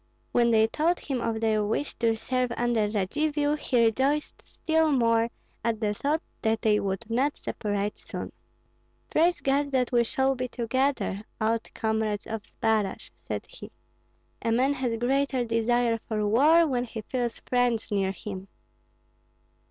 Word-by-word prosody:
When 235 -1 +3
they 220 -1 +5
told 320 +9 +1
him 265 -4 -3
of 225 -1 -2
their 215 -1 +2
wish 225 +7 -1
to 230 -1 +2
serve 250 +2 -1
under 235 -3 +1
Radzivill, 290 +9 0
he 245 -5 +2
rejoiced 270 +6 0
still 320 -1 +1
more 230 -3 +3 0.3
at 230 -2 0
the 210 -2 0
thought 295 +9 -1 0.2
that 220 -1 0
they 210 -1 +4
would 195 +2 -3
not 260 +6 0
separate 205 -1 -3
soon. - - -6 0.8
"Praise 345 +3 +3
God 280 +1 +1
that 255 -1 +1
we 240 -1 +4
shall 265 +3 +1
be 255 -1 -3
together, 250 -3 -1 0.2
old 225 +1 0
comrades 220 -2 -1
of 225 -2 -5
Zbaraj!" 215 -3 -1 0.2
said - - -3
he. - - -11 0.7
"A 230 - 0
man 260 +5 +3
has 250 -4 -1
greater 265 +1 +1
desire 230 0 +1
for 215 -1 -2
war 305 +10 +5
when 250 -5 0
he 225 -2 -6
feels 240 +1 -2
friends 245 -3 +1
near 195 -2 +1
him." 195 0 -7
235 Hz, 150 wpm, -27 LUFS, 220-270 Hz, 0.8 s, they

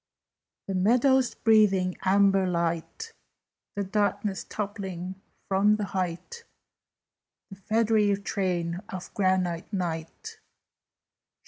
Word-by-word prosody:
"The 195 - -4
meadows 250 +7 +3
breathing 200 -5 +3
amber 195 0 +3
light, 170 - -2 0.6
The 200 - -1
darkness 200 0 -1
toppling 190 -3 -5 0.3
from 200 +2 +3
the 210 - -3
height, 185 - -4 1.1
The 195 - -9
feathery 215 0 +2
train 180 -4 -2
of 185 -1 -8
granite 185 -3 0
Night? 170 -5 -5
195 Hz, 90 wpm, -27 LUFS, 180-210 Hz, 1.1 s, meadows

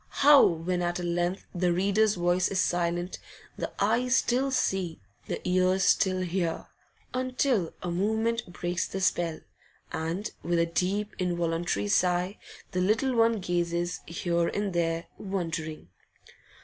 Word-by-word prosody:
How, 290 0 +9
when 175 +2 +1
at 175 0 -1
length 175 +1 -1
the 180 -1 +1
reader's 200 +4 +2
voice 175 +1 +2
is 195 - -1
silent, 175 +1 0 0.4
the - - -4
eyes 235 +5 +2
still 260 +3 +2
see, 190 -10 -1 0.3
the - - -4
ears 185 +1 +3
still 185 -1 +3
hear, 175 -2 -2 0.5
until 255 - 0
a 175 - -2
movement 220 +3 0
breaks 175 0 -2
the 195 - -4
spell, 170 -3 0 0.5
and 165 +6 -3
with 175 0 0
a 170 - +3
deep, 195 +5 -1
involuntary 170 - -1
sigh 180 - +1 0.3
the 180 -1 0
little 225 +7 +2
one 230 0 +4
gazes 175 0 -1
here 170 0 0
and 205 -2 -2
there, 165 -1 0
wondering? 165 - -4
180 Hz, 135 wpm, -28 LUFS, 170-200 Hz, 0.5 s, How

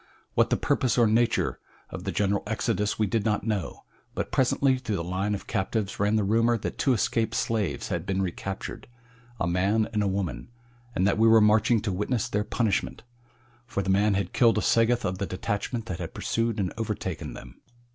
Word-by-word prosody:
What - - +3
the - - +2
purpose 130 -1 +1
or 120 - +5
nature 115 +2 +1 0.3
of - - -7
the - - -1
general 100 0 +1
exodus 105 -1 -1
we 110 - +2
did 110 +1 0
not 105 -2 0
know, 105 -6 -3 0.3
but - - -3
presently 130 0 +2
through 115 -5 -3
the 85 - -2
line 95 +4 -1
of 100 - -8
captives 100 +1 -2
ran 105 +2 +2
the 110 - +2
rumor 115 +4 +3
that - - -5
two 135 - +3
escaped 115 0 0
slaves 110 -5 -1
had 85 +2 -3
been 95 -1 0
recaptured 95 +1 -4 0.5
a - - +1
man 95 +5 +1
and 105 - +1
a 100 - +1
woman 95 -11 -3 0.5
and 95 - +2
that 100 +2 +2
we 115 - +5
were 115 0 +7
marching 110 +1 +4
to 105 -2 -2
witness 110 +6 -1
their 105 -4 -1
punishment, 110 -2 -1 0.6
for 110 -5 -2
the 95 - 0
man 100 +1 +3
had 100 - -2
killed 115 -2 +4
a - - +2
Sagoth 115 +1 +3
of 90 +1 -2
the 100 - -2
detachment 105 +5 -3
that 90 -6 -5
had 85 -2 -6
pursued 115 -1 -1
and 95 -3 -1
overtaken 105 -6 -4
them. - - -12
105 Hz, 200 wpm, -27 LUFS, 95-115 Hz, 0.6 s, were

